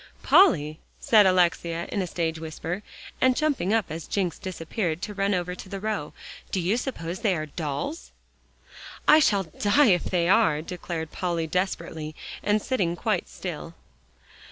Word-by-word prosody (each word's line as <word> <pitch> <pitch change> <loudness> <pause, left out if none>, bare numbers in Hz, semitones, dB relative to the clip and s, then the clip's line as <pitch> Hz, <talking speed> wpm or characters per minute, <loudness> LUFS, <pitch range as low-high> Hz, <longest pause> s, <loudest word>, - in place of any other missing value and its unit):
"Polly," 155 - +5 0.2
said 210 -4 +5
Alexia 170 -2 +2
in 200 - 0
a 185 - -2
stage 165 -2 -2
whisper, 160 +4 -5 0.4
and 255 -1 +4
jumping 280 - +1
up 225 -3 +2
as 160 +1 -6
Jencks 185 -4 -1
disappeared, 175 -1 -3
to 210 - -4
run 200 0 +1
over 180 0 -2
to 185 +1 -10
the 195 - -5
row, 210 -7 -3 0.4
"do 190 - -1
you 180 +5 +1
suppose 190 -9 -4
they 210 -5 +2
are 155 -2 -3
dolls?" 155 - -4 1.0
"I 310 - +8
shall 205 -9 +3
die 205 - +3
if 175 - +2
they 175 -2 +1
are," 165 -7 +3
declared 165 -2 -5
Polly 170 -3 -1
desperately, 160 -3 -3 0.3
and 210 0 +1
sitting 190 -10 0
quite 215 +4 -1
still. 170 -2 -7
180 Hz, 155 wpm, -26 LUFS, 165-210 Hz, 1.0 s, I